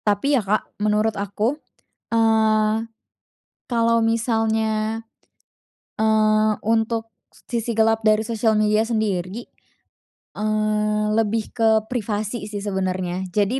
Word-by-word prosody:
Tapi 210 +8 +1
ya 265 - +3
Kak, 210 +1 -2
menurut 215 +1 +2
aku, 210 +8 -2 0.5
eee, 220 -1 +3 0.9
kalo 230 -1 +2
misalnya, 225 -1 0 1.0
eee, 215 0 +3
untuk 225 0 0 0.2
sisi 235 -1 -4
gelap 225 0 +3
dari 215 0 +3
sosial 220 -1 +1
media 215 0 +3
sendiri, 215 -2 -2 0.9
eee, 215 0 0
lebih 220 0 0
ke 225 -2 +2 0.2
privasi 215 -1 -3
sih 205 -1 -6
sebenernya. 185 -2 -2
Jadi 210 +5 +1
220 Hz, 100 wpm, -22 LUFS, 210-225 Hz, 1.0 s, ya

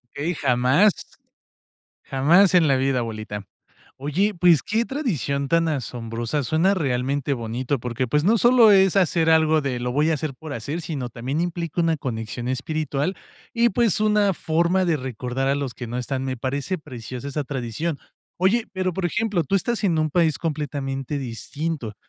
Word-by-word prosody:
Eh, 160 +5 -1
jamás, 130 +10 +4 1.1
jamás 170 +9 +4
en 170 -4 +5
la 135 - +4
vida, 130 -1 +1
abuelita. 110 -3 -5 0.5
Oye, 180 +10 0
pues, 170 -4 +4
qué 225 +2 0
tradición 155 - -2
tan 165 0 +2
asombrosa, 120 0 -3
suena 165 +9 +2
realmente 140 -2 -1
bonito, 120 +2 -2
porque, 125 +1 -2
pues, 150 +5 +1
no 225 +4 +4
solo 240 -1 +6
es 195 -1 +4
hacer 165 -3 +3
algo 160 -1 +4
de: 125 -3 -2
"Lo 125 0 -2
voy 150 +4 +2
a 160 - +3
hacer 145 -2 -4
por 155 +2 -9
hacer", 150 +4 -4
sino 140 -7 -4
también 130 +7 -3
implica 170 -1 -2
una 165 -1 +2
conexión 120 -1 -5
espiritual 150 +4 -2 0.4
y, 235 0 +3
pues, 220 -1 +1
una 210 -3 +3
forma 170 +4 +1
de 165 -3 +2
recordar 130 +1 -3
a 140 - +2
los 140 -3 -3
que 120 - -7
no 120 +2 -5
están, 130 +1 -3
me 130 -1 -3
parece 140 +9 -2
preciosa 130 -2 -8
esa 145 +1 -3
tradición, 135 +4 -3 0.4
oye, 205 +6 +2
pero, 185 -2 -1
por 180 0 -1
ejemplo, 210 -3 0
tú 150 - -2
estás 225 +4 0
en 170 -4 +2
un 155 0 +1
país 160 -2 +2
completamente 145 -3 -3
distinto, 135 0 -4
150 Hz, 170 wpm, -23 LUFS, 130-175 Hz, 1.1 s, solo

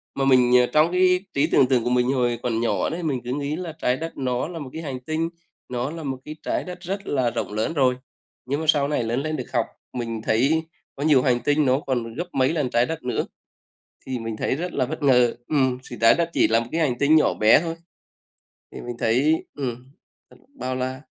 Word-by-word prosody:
Mà 135 - 0
mình 125 -2 +5
ờ, 125 - +4
trong 155 +2 +4
cái 180 0 +4
trí 140 - +2
tưởng 130 - +4
tượng 125 -3 +2
của 120 - 0
mình 125 0 +2
hồi 120 -3 0
còn 115 -2 0
nhỏ 105 -5 0
đấy, 170 +2 -4
mình 135 -6 -1
cứ 125 +1 -3
nghĩ 145 +1 -2
là 175 -2 -5
Trái 125 +1 +1
Đất 165 +2 -6
nó 125 0 -1
là 170 -1 -7
một 140 - -7
cái 160 - -5
hành 135 -5 -5
tinh, 155 +5 -2 0.4
nó 125 +2 -2
là 165 -1 -7
một 135 -2 -3
cái 155 - -7
Trái - - -1
Đất 180 -1 -8
rất 195 +3 -5
là 130 -4 +1
rộng 105 - -4
lớn 110 +9 -1
rồi 130 -4 +3 0.5
nhưng 140 +3 -1
mà - - -3
sau 145 -2 +4
này 145 -5 0
lớn 120 +4 -1
lên 155 +1 -2
được 125 - -6
học, 120 - +2 0.3
mình 115 -3 -4
thấy 135 +10 +2 0.3
có 140 - -4
nhiều 145 -5 +5
hành 125 -2 +2
tinh 145 +4 +2
nó 130 +1 +3
còn 120 -5 -3
gấp 170 +8 -3
mấy 130 +3 +2
lần 150 -6 0
Trái 120 0 +2
Đất 160 +3 -5
nữa, 125 -2 -1 0.8
thì 130 -2 -3
mình 115 -1 -4
thấy - - 0
rất 175 +3 -4
là - - +1
bất 155 +3 -6
ngờ 125 -4 +4
ừm, 130 -4 +1
thì 120 - -7
Trái 115 - +7
Đất 170 -1 0
chỉ - - +4
là 115 +1 +3
một 115 - -5
cái 165 - 0
hành 125 -6 +1
tinh 145 +4 +4
nhỏ 155 - +4
bé 110 +6 +5
thôi, 165 -1 -4 1.0
thì - - -8
mình 120 -1 -6
thấy 140 +8 +2
ừm, 125 -3 -4 0.4
th - - -19 0.2
bao 130 - -3
la. 130 +1 -3
130 Hz, 245 wpm, -23 LUFS, 125-155 Hz, 1.0 s, Trái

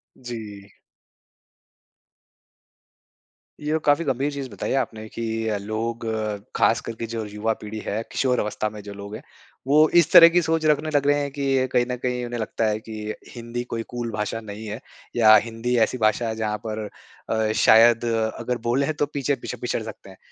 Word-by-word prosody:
जी। 105 -5 -8 2.9
ये 150 +1 0
काफ़ी 145 +3 +4
गंभीर 135 +1 0
चीज़ 140 -2 -5
बताई 100 - -5
है - - +2
आपने 110 -4 -3
कि 115 - -6 0.2
अ, 105 -2 0
लोग 110 +3 -4 0.5
ख़ास - - +3
करके 115 0 -5
जो 115 -1 -4
युवा 105 +2 -1
पीढ़ी 110 +1 -6
है, 105 +2 -1
किशोर 125 -2 +1
अवस्था 105 0 -1
में 105 0 -9
जो 100 - -8
लोग 100 +1 -8
है 115 - -8 0.5
वो 150 +3 +6
इस - - +2
तरह 165 0 +10
की 175 +1 +3
सोच 160 -1 0
रखने 150 0 +2
लग 140 0 +2
रहे 145 0 +4
हैं 140 - -3
कि 135 -2 +1
कहीं 120 - +3
न 125 - -1
कहीं 125 -1 -1
उन्हें 120 0 -4
लगता 110 +1 -1
है 105 0 0
कि 110 -1 -6 0.2
हिंदी 120 +1 -5
कोई 115 0 -2
कूल 120 -1 -4
भाषा 105 +1 -3
नहीं 110 0 -8
है। 105 +2 -5 0.4
या 110 -2 +7
हिंदी 115 +2 0
ऐसी 130 - -5
भाषा 110 +1 +2
है 110 - -2
जहाँ 105 -1 -2
पर 110 0 -3 0.4
अ, 110 -1 +1
शायद 115 +1 +6 0.3
अगर 125 -1 -2
बोल 135 +3 +2
है 155 - 0
तो 145 - 0
पीछे-पीछे 140 -3 -3
पिछड़ 120 -1 -2
सकते 110 -3 -10
हैं। 95 - -14
115 Hz, 185 wpm, -24 LUFS, 110-135 Hz, 2.9 s, तरह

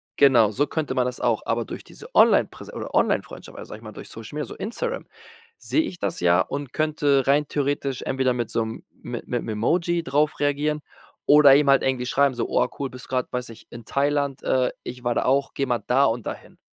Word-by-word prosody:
genau, 120 -7 +5
so 145 +7 0
könnte 155 -5 -2
man 125 -1 +2
das 125 0 -4
auch, 120 -3 +1
aber 115 0 -1
durch - - -8
diese - - -13
Onlinepräs - - +3
oder - - -6
Onlinefreundschaft, - - -1
also - - -9
sag 110 - -10
mal, 110 -1 -9
durch - - -10
Social 115 +5 -9
Media, 150 - -2
so - - -10
Instagram, 475 - -4 0.5
sehe 315 - 0
ich 180 - -6
das - - -2
ja 85 0 +4
und 140 +3 -4
könnte 150 -3 +1
rein 145 +1 +3
theoretisch 140 -2 -1
entweder 130 -1 0
mit 120 -2 -3
so 115 - 0
'nem 110 - -7
mit - - -8
mit - - -1
'm - - -7
Emoji 170 +11 +1
drauf 150 +2 0
reagieren 145 +1 0 0.4
oder 145 -2 +8
ihm 145 -1 +3
halt 135 -1 +5
irgendwie 130 -2 0
schreiben 140 0 +2
so: - - -2
„Oh, 125 - +2
cool, 140 - -2
bist 125 0 -12
grad, 130 -1 -1
weiß 125 -1 -3
ich, 115 - -13
in 120 -1 -9
Thailand. 140 0 0
Äh, 130 -1 +1
ich 125 0 -8
war 120 -1 +1
da - - 0
auch. 135 +2 +1
Geh 135 - -1
mal 120 -2 0
da 135 +3 +4
und 115 -2 -1
dahin.“ - - -8
135 Hz, 220 wpm, -24 LUFS, 125-145 Hz, 0.5 s, oder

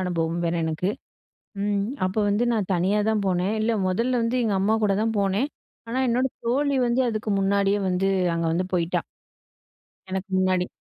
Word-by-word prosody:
அனுபவம் 170 -2 -1
வேற 170 0 0
எனக்கு. 160 +4 -1 0.7
ம், 205 0 +1 0.3
அப்ப 185 +3 -2
வந்து 205 +4 +1
நான் 210 -5 -1
தனியா 190 +4 +1
தான் 215 -2 +1
போனேன். 185 +2 +1
இல்ல, 230 +2 +1 0.2
முதல்ல 235 +6 +1
வந்து 230 +2 0
எங்க 215 -3 +1
அம்மாகூட 210 0 +2
தான் 225 0 0
போனேன். 200 +7 +1 0.4
ஆனா, 250 +3 -2
என்னோட 250 +2 +2 0.2
தோழி 275 +4 +1
வந்து 240 +2 +1
அதுக்கு 215 -1 -2
முன்னாடியே 200 +1 +2
வந்து 185 +1 +1 0.3
அங்க 165 0 -1
வந்து 180 +3 0
போயிட்டா. 170 -1 0 1.1
எனக்கு 190 +1 -3
முன்னாடி. 185 -1 +2
200 Hz, 160 wpm, -24 LUFS, 185-225 Hz, 1.1 s, அம்மாகூட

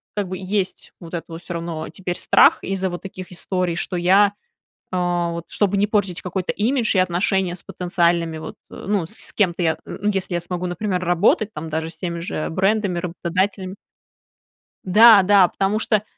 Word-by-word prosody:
как 205 -2 -2
бы, 185 0 -5
есть 190 0 -3
вот 170 -1 -8
это 170 - -5
вот 165 - -7
всё 175 0 -6
равно 165 -2 -5
теперь 180 -2 -5
страх - - +5
из-за 190 -1 -2
вот 175 - -6
таких 185 -1 -9
историй, 180 -1 -2
что 180 - -3
я, 195 +4 +4 0.6
э - - 0 0.3
вот, 170 0 -5
чтобы 205 -1 +1
не 200 - +3
портить 200 -4 0
какой-то 185 0 -3
имидж 230 0 +1
и 185 - +4
отношения 185 0 +1
с - - -10
потенциальными 170 -3 0
вот, 155 - -8 0.2
э, - - -9
ну, 200 -5 0
с 215 - -4
с - - 0
кем-то 185 -4 +1
я, 160 -2 +1
ну 205 +2 -3
если 190 -1 -2
я - - +1
смогу, 175 +1 -4
например, 180 +1 -2
работать 180 +4 +2
там, 155 +2 -6
даже 160 +1 -3
с 165 - -9
теми 170 0 -4
же 165 -2 -3
брендами, 195 +1 0
работодателями 185 +2 -2 1.1
Да, 215 +2 +8
да, 195 -1 +5
потому 195 +4 -1
что 215 -2 +1
185 Hz, 190 wpm, -21 LUFS, 175-200 Hz, 1.1 s, Да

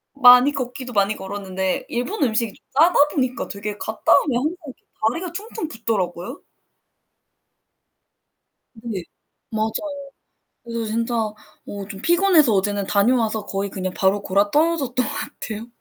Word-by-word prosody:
많이 250 0 +8
걷기도 255 -2 -5
많이 200 0 +2
걸었는데 190 -1 -3
일본 270 - -2
음식이 230 -3 0
좀 - - -24
짜다 325 +6 +5 0.2
보니까 255 -3 -1
되게 205 +1 -5
갔다 220 +1 +1
오면 265 -5 0
항상 305 +7 -1
이렇게 265 - -12 0.2
다리가 335 +8 -4
퉁퉁 420 -1 -5
붓더라고요. 220 - -3 2.3
네. 220 -5 -5 0.5
맞아요. 220 -1 -1 0.9
그래서 230 -1 -3
진짜 230 +2 -1
어 215 -2 -1 0.5
좀 195 -2 -8
피곤해서 345 - +4
어제는 200 0 0
다녀와서 220 +1 +2
거의 195 0 -3
그냥 185 -1 -4
바로 195 +1 +2
곯아떨어졌던 255 - +1
것 - - -4
같아요. 220 +1 -6
230 Hz, 310 characters per minute, -22 LUFS, 205-265 Hz, 2.3 s, 많이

